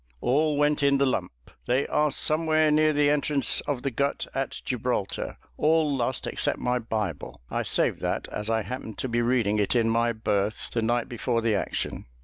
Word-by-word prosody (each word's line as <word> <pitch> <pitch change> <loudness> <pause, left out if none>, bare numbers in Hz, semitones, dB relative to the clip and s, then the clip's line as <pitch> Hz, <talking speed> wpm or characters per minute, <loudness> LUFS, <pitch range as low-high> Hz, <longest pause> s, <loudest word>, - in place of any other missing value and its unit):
"All 150 - +2
went 145 0 +2
in 140 -1 +4
the 140 - +3
lump. 95 -9 -1 0.4
They 130 +3 +2
are 150 0 +2
somewhere 155 +1 +2
near 155 +1 +4
the 145 -1 +3
entrance 145 -3 +1
of 135 -4 -2
the 140 - -1
Gut 140 +4 -1
of 135 0 -1
Gibraltar 125 -5 -3 0.2
all 155 -2 +2
lost 125 0 -1
except - - -1
my 125 0 0
Bible: 105 -9 -4
I - - 0
saved - - +1
that, - - -2
as 105 +1 -4
I 110 -1 +1
happened 125 -3 -6
to - - -2
be 120 -1 0
reading 115 -4 +1
it 105 +4 +1
in 115 -2 +3
my 115 +1 +2
berth 105 -2 -1
the 115 - -1
night 120 +1 0
before 120 -2 -1
the 115 -2 +2
action!" 100 - -3
125 Hz, 190 wpm, -26 LUFS, 115-145 Hz, 0.4 s, in